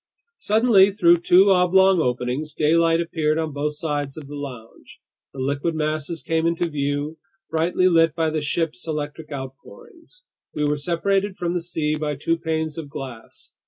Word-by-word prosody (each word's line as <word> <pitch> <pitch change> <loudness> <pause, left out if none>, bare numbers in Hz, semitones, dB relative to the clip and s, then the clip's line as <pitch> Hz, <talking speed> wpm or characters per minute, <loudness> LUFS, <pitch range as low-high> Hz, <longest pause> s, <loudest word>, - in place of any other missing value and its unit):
Suddenly, 210 -2 +4
through 175 -3 +4
two 185 +3 +5
oblong 190 0 +4
openings, 125 +4 -2
daylight 165 +2 +3
appeared 160 -2 0
on 160 -2 -2
both 150 +1 -2
sides 145 -2 -3
of 155 - -8
the 145 - -10
lounge. 125 -6 -10 0.3
The - - -15
liquid 140 +5 -1
masses 155 0 -3
came 160 +2 0
into 170 +1 0
view, 145 +1 -3 0.3
brightly 170 +3 +2
lit 165 -3 +3
by 160 -1 0
the 155 0 -1
ship's 150 -2 -2
electric 150 0 -5
outpourings. 335 - -11 0.3
We 150 - 0
were 150 0 0
separated 190 +5 -1
from 175 -1 -2
the 175 - -1
sea 155 -3 -2
by 150 -1 -2
two 165 +4 -1
panes 160 -1 -2
of 150 -3 -8
glass. 130 -5 -9
160 Hz, 160 wpm, -22 LUFS, 145-170 Hz, 0.3 s, two